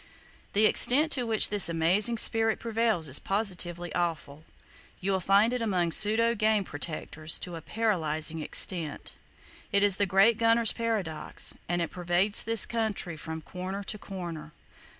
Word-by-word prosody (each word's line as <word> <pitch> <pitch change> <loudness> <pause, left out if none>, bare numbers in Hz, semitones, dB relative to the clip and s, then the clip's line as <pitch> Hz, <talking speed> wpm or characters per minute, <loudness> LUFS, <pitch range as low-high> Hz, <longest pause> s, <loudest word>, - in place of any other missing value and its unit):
The 210 +2 +3
extent 295 +8 +4
to 250 -3 0
which 220 -2 +3
this 205 -4 +5
amazing 185 +8 +1
spirit 225 0 +3
prevails 225 -7 -1
is 130 +1 +1
positively 175 -4 -3
awful. 160 -4 -4 0.6
You 195 +2 -2
will 190 - 0
find 200 +6 +2
it 250 - -3
among 180 -6 -1
pseudo 225 +5 +4
game 215 -2 +1
protectors 155 0 -3
to 175 - -7
a 165 - -8
paralyzing 160 -6 -2
extent! 160 -1 -1 0.6
It 200 0 +2
is 200 -2 +2
the 200 - 0
great 195 +4 +3
gunner's 230 0 +3
paradox, 210 -9 -3 0.2
and 175 0 -1
it 165 - -6
pervades 180 +3 +1
this 225 -2 +3
country 215 -7 -3
from 160 +1 -8
corner 185 +4 -7
to 210 +1 -6
corner. 170 -6 -8
195 Hz, 150 wpm, -27 LUFS, 170-220 Hz, 0.6 s, this